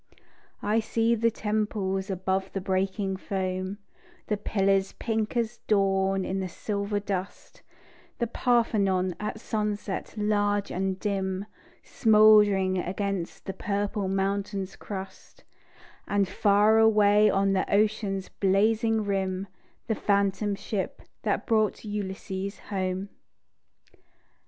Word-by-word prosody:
I 215 +2 +2
see 225 +1 +1
the 230 0 +2
temples 210 -3 -2
above 190 0 -1
the 195 - -1
breaking 190 +1 -1
foam, 185 0 -3 0.5
The 210 - -1
pillars 195 -1 +1
pink 220 0 -2
as 235 0 -1
dawn 195 -2 +2
in 190 +1 -2
the 190 -1 -3
silver 205 +2 -2
dust; 195 -2 -5 0.6
The 235 - 0
Parthenon 205 -7 +1
at 210 +1 -4
sunset 210 -3 -3
large 205 -1 +1
and 190 +1 -2
dim, 195 -1 -2 0.4
Smouldering 210 -4 +5
against 190 -1 -3
the 195 - -4
purple 205 -1 -2
mountain's 195 0 -2
crust; 195 -2 -9 0.6
And 200 -1 +1
far 205 +3 +4
away 210 -1 +5
on 195 0 +2
the 190 - 0
ocean's 205 -2 +1
blazing 215 +3 +2
rim, 190 -1 -1 0.4
The 225 - 0
phantom 200 0 +1
ship 195 -1 -4 0.2
that - - -1
brought 220 -2 +1
Ulysses 195 -1 -4
home. 190 -1 -3
200 Hz, 110 wpm, -27 LUFS, 190-210 Hz, 0.6 s, Smouldering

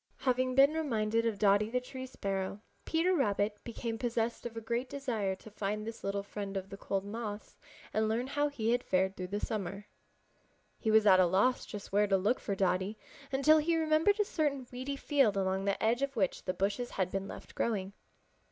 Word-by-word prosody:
Having 255 0 +1
been 275 +3 +6
reminded 230 -7 0
of 220 -3 -1
Dotty 205 +1 +3
the 250 +2 +1
Tree 260 +1 -7
Sparrow, 195 -4 -3 0.3
Peter 335 +3 +2
Rabbit 210 - 0
became 230 -1 -4
possessed 235 -1 -1
of 230 -1 -10
a - - -1
great 235 +3 -2
desire 225 -9 -2
to 215 +3 -14
find 210 +1 -3
this 225 0 -7
little 200 0 -1
friend 200 -1 -5
of 190 0 -6
the - - -5
cold 195 0 -2
months 210 0 -6 0.4
and 215 0 +1
learn 230 +3 0
how 290 +2 0
he 230 -6 -1
had 245 +1 +1
fared 190 +1 +1
through 185 -1 -5
the 205 +3 -2
summer. 200 -2 -4 0.9
He 220 - -1
was 220 0 +5
at 185 -2 +7
a 185 - +6
loss 200 +9 +2
just 205 -2 -8
where 205 +1 +3
to 195 -1 +3
look 205 +7 +1
for 200 - -3
Dotty 190 +2 0 0.3
until 300 +4 +5
he 330 +2 +1
remembered 320 +6 +3
a 420 - +3
certain 290 -7 -1
weedy 260 +3 -4
field 275 -8 +2
along 190 0 0
the 200 -1 0
edge 235 +3 +2
of 275 -1 -1
which 190 -5 0
the 185 - 0
bushes 205 +6 -1
had 185 -1 -1
been 195 0 -2
left - - -10
growing. 200 -4 -1
220 Hz, 205 wpm, -32 LUFS, 200-255 Hz, 0.9 s, at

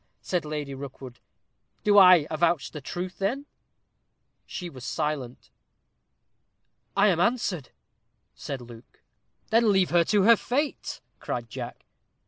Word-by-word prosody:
said 180 -4 -1
Lady 150 -2 -4
Rookwood. 135 -2 -9 0.6
"Do 205 -1 +6
I 180 -5 +8
avouch 165 -1 +1
the 150 - -7
truth, 180 +6 -6
then?" 245 +9 -1 1.0
She 180 - -6
was 130 -7 -11
silent. 150 -6 -4 1.5
"I 200 +1 +5
am 175 -3 +1
answered," 180 - 0 0.6
said 135 -3 -6
Luke. 120 -1 -14 0.5
"Then 225 -1 +4
leave 190 -2 +2
her 170 0 +5
to 205 +1 +3
her 230 +3 +8
fate," 285 +7 -2 0.2
cried - - -5
Jack. - - -7
175 Hz, 120 wpm, -26 LUFS, 140-200 Hz, 1.5 s, I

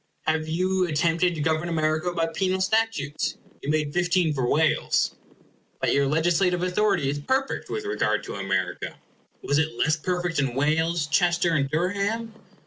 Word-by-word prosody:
Have 155 0 0
you 185 +3 +1
at 155 - -3
tempted 170 +2 +2
to 155 - -4
govern 160 +2 0
America 155 +1 0
by 165 -2 0
penal 185 +3 -1
statutes? 185 -8 0 0.2
You 140 - -5
made 150 -1 0
fifteen 175 -2 +2
for 130 -4 -1
Wales. 155 +1 +2 0.7
But - - +1
your 140 0 +2
legislative 175 +4 +2
authority 185 -5 +1
is 145 +1 -1
perfect 265 - -1
with 425 - -3
regard 410 - 0
to - - -7
America. - - -2 0.5
Was 145 +1 +2
it 160 0 -1
less 155 0 +2
perfect 175 0 -1
in 135 -4 0
Wales, 160 +3 +1
Chester, 170 +2 +2
and 140 -3 +1
Durham? 200 +8 -1
165 Hz, 160 wpm, -25 LUFS, 155-180 Hz, 0.7 s, tempted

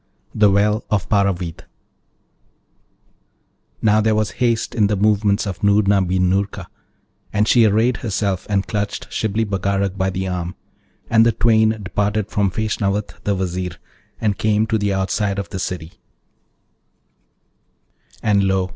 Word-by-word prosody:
THE 105 -1 +4
WELL 105 +2 +2
OF 105 -3 0
PARAVID 95 -5 0 2.2
Now, 110 0 +4
there 110 0 +2
was 110 -1 0
haste 115 -2 +1
in 105 -4 +3
the 105 - 0
movements 105 0 +2
of 95 -3 -5
Noorna 100 -1 +3
bin 90 0 +1
Noorka, 95 +2 -1 0.7
and 105 0 +1
she 120 -1 +5
arrayed 110 +4 +2
herself 100 -4 -2
and 100 -2 +1
clutched 105 -1 -4
Shibli 110 +1 -1
Bagarag 100 -1 -1
by 95 0 +1
the 95 0 -3
arm, 90 -1 -4 0.5
and 115 0 +4
the 115 - +4
twain 110 -1 +3
departed 105 +1 -1
from 100 -2 +1
Feshnavat 105 0 -2
the 100 - +1
Vizier, 90 -1 -3 0.4
and 105 -3 -1
came 110 0 +2
to 110 0 0
the 100 -1 0
outside 95 +1 -1
of 100 - -4
the 95 - -5
city, 85 -3 -4 2.3
and 100 -3 +3
lo! 95 -1 +1
100 Hz, 140 wpm, -20 LUFS, 95-110 Hz, 2.3 s, she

